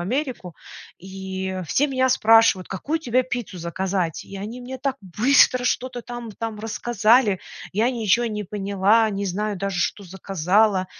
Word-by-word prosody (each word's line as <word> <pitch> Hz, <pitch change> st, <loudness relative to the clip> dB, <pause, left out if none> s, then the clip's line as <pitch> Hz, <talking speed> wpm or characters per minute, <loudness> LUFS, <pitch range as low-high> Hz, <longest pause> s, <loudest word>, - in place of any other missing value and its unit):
Америку, 235 Hz, -, -3 dB, 0.4 s
и 190 Hz, 0 st, -5 dB
все 290 Hz, -, +1 dB
меня 260 Hz, -1 st, +1 dB
спрашивают: 225 Hz, -6 st, +4 dB
"Какую 300 Hz, -, -3 dB
тебе 255 Hz, -3 st, +1 dB
пиццу 245 Hz, -7 st, -5 dB
заказать?" 180 Hz, 0 st, -2 dB
И 195 Hz, -, -10 dB
они 220 Hz, +6 st, -6 dB
мне 255 Hz, +1 st, -7 dB
так 270 Hz, 0 st, -2 dB
быстро 245 Hz, +6 st, +3 dB
что-то 250 Hz, -1 st, -1 dB
там 240 Hz, -2 st, -7 dB
там 220 Hz, 0 st, -5 dB
рассказали, 225 Hz, -1 st, +2 dB, 0.3 s
я 225 Hz, +5 st, +2 dB
ничё 235 Hz, -1 st, +1 dB
не 210 Hz, -2 st, -4 dB
поняла, 200 Hz, +3 st, +2 dB
не 200 Hz, 0 st, -3 dB
знаю 205 Hz, +2 st, -2 dB
даже, 195 Hz, -1 st, -2 dB
что 200 Hz, -, -2 dB
заказала. 190 Hz, +2 st, +1 dB
210 Hz, 145 wpm, -23 LUFS, 190-245 Hz, 0.4 s, спрашивают